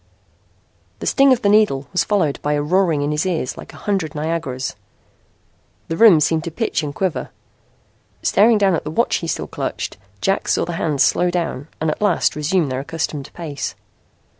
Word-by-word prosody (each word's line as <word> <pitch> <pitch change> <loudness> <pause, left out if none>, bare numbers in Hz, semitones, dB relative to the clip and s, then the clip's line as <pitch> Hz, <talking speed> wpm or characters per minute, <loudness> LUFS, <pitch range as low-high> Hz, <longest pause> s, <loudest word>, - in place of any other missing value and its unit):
The - - -7
sting 275 -1 +4
of 250 -1 +2
the 200 - +4
needle 200 -11 +3
was 180 - +2
followed 180 -9 0
by 150 - 0
a 145 - +1
roaring 170 -2 +2
in 145 - -1
his 150 +1 0
ears 170 -8 -2
like - - -10
a - - -13
hundred 190 -7 -2
Niagaras. 150 -4 -3 1.2
The 165 - -1
room 195 -4 +7
seemed 160 +1 +1
to - - -2
pitch 160 - -1
and 145 -2 -5
quiver. 190 -4 -2 0.9
Staring 220 +2 +4
down 195 -2 +3
at 165 - -1
the 150 - -5
watch 200 +10 +1
he 165 - -5
still - - -2
clutched, - - -4 0.2
Jack 195 - 0
saw - - +1
the 175 - -4
hands 155 -4 +1
slow 180 - +2
down 170 -5 -3
and 160 0 0
at - - -6
last 210 - +2
resume 155 +2 +1
their 130 0 -2
accustomed 150 -1 -4
pace. 155 -5 -5
165 Hz, 190 wpm, -20 LUFS, 150-190 Hz, 1.2 s, room